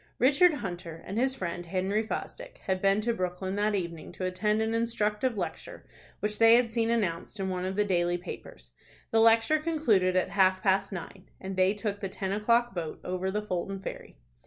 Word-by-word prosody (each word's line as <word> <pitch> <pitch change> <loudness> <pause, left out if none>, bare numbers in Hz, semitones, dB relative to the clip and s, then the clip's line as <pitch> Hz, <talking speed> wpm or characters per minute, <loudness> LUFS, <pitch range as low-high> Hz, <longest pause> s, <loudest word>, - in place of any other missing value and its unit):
Richard 295 +6 +5
Hunter 175 - -6
and 200 +4 -3
his 265 +1 +1
friend 175 -4 -4
Henry 190 +4 0
Fosdick - - -6
had 190 -1 -1
been 195 +1 +3
to 235 +2 0
Brooklyn 185 -1 -3
that 210 0 +1
evening 170 -4 -4
to 185 - -4
attend 210 +4 0
an 220 0 0
instructive 230 0 0
lecture 170 -4 -5 0.4
which 210 0 -2
they 225 0 +8
had 240 -1 +2
seen 225 0 0
announced 210 -3 -1
in 190 -1 -1
one 185 -1 -2
of 190 +1 -3
the 210 +1 +2
daily 175 -2 +1
papers. - - -10 0.4
The 225 - +4
lecture 230 +7 +5
concluded 240 - +2
at 185 - +2
half 185 -1 +3
past 195 0 +2
nine, 190 +1 -8
and 190 0 -5
they 185 +2 +3
took 205 -1 -3
the 195 - -3
ten 190 0 -4
o'clock 230 +3 +2
boat 165 -4 -5
over 185 +1 -2
the 210 +2 -2
Fulton 195 0 -3
ferry. 195 - -8
195 Hz, 195 wpm, -29 LUFS, 185-225 Hz, 0.4 s, they